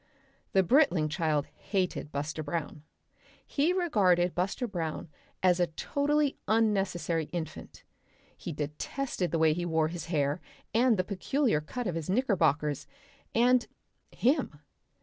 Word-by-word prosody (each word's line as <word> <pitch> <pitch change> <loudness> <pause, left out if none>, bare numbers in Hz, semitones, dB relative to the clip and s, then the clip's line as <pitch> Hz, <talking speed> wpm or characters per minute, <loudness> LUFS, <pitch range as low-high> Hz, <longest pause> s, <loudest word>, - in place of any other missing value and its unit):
The 190 - +5
Britling 185 - +3
child 155 -3 0
hated 185 -6 -2
Buster 145 +2 -3
Brown. 155 -1 -4 0.6
He 300 +4 +1
regarded 195 - +2
Buster 195 +8 -1
Brown 170 -7 -4 0.3
as 180 -1 +4
a 175 - +3
totally 285 - 0
unnecessary 195 -7 +1
infant. 165 0 -7 0.5
He - - -6
detested 160 - -3
the 165 - 0
way 160 -1 +4
he 175 +2 -3
wore 160 -2 +1
his 170 0 -6
hair 150 -1 0 0.3
and 235 0 +4
the 185 - +2
peculiar 215 - 0
cut 245 +11 -5
of 180 - -1
his 165 0 -4
knickerbockers 165 - +1 0.5
and 245 +1 +4 0.4
him. 255 - 0
180 Hz, 130 wpm, -29 LUFS, 160-235 Hz, 0.6 s, The